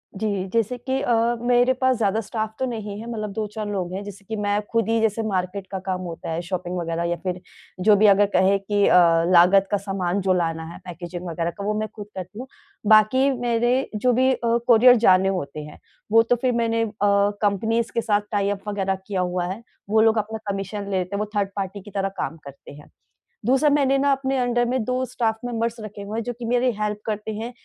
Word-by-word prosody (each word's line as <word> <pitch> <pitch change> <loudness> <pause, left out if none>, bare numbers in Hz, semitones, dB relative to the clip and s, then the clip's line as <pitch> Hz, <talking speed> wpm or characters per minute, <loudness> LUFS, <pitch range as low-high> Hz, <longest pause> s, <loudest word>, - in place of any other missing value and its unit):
जी। 200 -2 -2
जैसे 230 +2 0
कि 260 +2 -2
अ, 240 - +1 0.3
मेरे 245 +1 +3
पास 260 0 +1
ज़्यादा 215 -1 +1
स्टाफ़ 220 0 -4
तो 260 - 0
नहीं 215 -4 -5
है 230 +2 -7
मतलब 215 -2 -4
2-4 215 0 -4
लोग 185 -3 -3
हैं। 195 +2 -4
जैसे 200 -1 -10
कि 220 - -4
मैं 205 0 0
खुद 230 -1 +1
ही 230 0 +2
जैसे 225 0 +1
मार्केट 190 0 -3
का 190 - -3
काम 185 -1 -2
होता 170 -3 -7
है, 165 +1 -2
शॉपिंग 180 0 -4
वग़ैरह 165 -1 -2
या 175 - 0
फिर, 180 -1 -3 0.4
जो 210 +3 +5
भी 210 +2 +4
अगर 205 0 +6
कहे 195 +1 +4
कि 205 +1 +1
अ, - - +6 0.3
लागत 185 +2 +6
का 205 - +3
सामान 195 -1 -2
जो 190 0 +2
लाना 165 -2 -1
है, - - -10
पैकेज़िग 175 0 -7
वग़ैरह 165 0 -2
का 200 - -5
वो 210 - 0
मैं 215 - -2
खुद 210 -2 -8
करती 190 +3 -7
हूँ। 255 - -7 0.4
बाकी 220 +6 +5
मेरे 240 +2 +1
जो 245 +4 +2
भी 260 +2 +3
अ, 235 -2 +1
कोरियर 245 +1 +7
जाने 185 +1 +5
होते 155 -6 -4
हैं, 150 0 -11 0.3
वो 225 +1 +7
तो 240 +2 +2
फिर 250 +1 0
मैंने 230 -1 0
अ, 225 - -2 0.5
कम्पनीज़ 220 +3 0
के 230 - 0
साथ 210 -2 +1
टाइ-अप 205 -1 -1
वग़ैरह 195 -2 -1
किया 195 -3 -1
हुआ 180 0 -1
है। 215 - -11 0.3
वो 220 +1 +4
लोग 225 0 +4
अपना 220 +1 -2
कमीशन 195 +1 -4
ले 195 - 0
लेते 185 +2 -3
हैं। - - -2
वो 210 - 0
थर्ड 200 -1 +1
पार्टी 195 0 -4
की 205 +2 -13
तरह 195 0 -1
काम 160 - -3
करते 140 -1 -12
हैं। 145 +1 -15 0.6
दूसरा 270 +5 +3
मैंने 275 -2 +3
ना 280 +1 +2
अपने 270 0 0
अंडर 245 -1 +1
में 250 0 -1
2 255 +3 -1
स्टाफ़ 230 -3 -1
मेंबर्स 230 -1 -2
रखे 210 -1 -8
हुए 205 +2 -5
हैं 230 - -2
जो 245 - -4
कि 240 - -5
मेरी 245 +2 +2
हेल्प 210 0 -2
करते 215 0 -3
हैं 225 +3 -5
210 Hz, 230 wpm, -23 LUFS, 190-230 Hz, 0.6 s, कोरियर